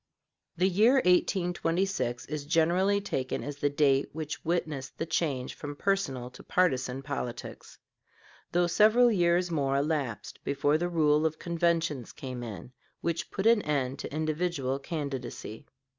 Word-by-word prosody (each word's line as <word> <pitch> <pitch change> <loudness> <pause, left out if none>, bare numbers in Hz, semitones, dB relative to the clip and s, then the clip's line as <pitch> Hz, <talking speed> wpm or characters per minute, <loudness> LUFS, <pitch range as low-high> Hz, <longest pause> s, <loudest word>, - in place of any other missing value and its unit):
The 180 +2 +3
year 210 +7 +4
1826 180 - +1
is 150 -1 -5
generally 175 +5 +3
taken 130 -10 -3
as 145 0 -5
the 145 0 +1
date 140 -1 +2
which 155 0 -5
witnessed 155 -5 -2
the 165 - -2
change 150 -6 -1
from 145 -1 -7
personal 135 -10 -1
to - - -13
partisan 135 -7 0
politics, 135 -4 -6 0.7
though 175 0 +3
several 220 +7 +5
years 175 -2 +2
more 140 -4 +1
elapsed 140 -8 -2
before 145 +2 +1
the 175 +1 -1
rule 155 -3 +3
of 160 -1 0
conventions 170 -6 -1
came 130 -2 -6
in, 110 -2 -7 0.3
which 170 0 -2
put 195 - -4
an 230 -1 +6
end 140 -5 -1
to - - -6
individual 155 -3 -1
candidacy. 135 -7 -5
155 Hz, 140 wpm, -29 LUFS, 135-175 Hz, 0.7 s, an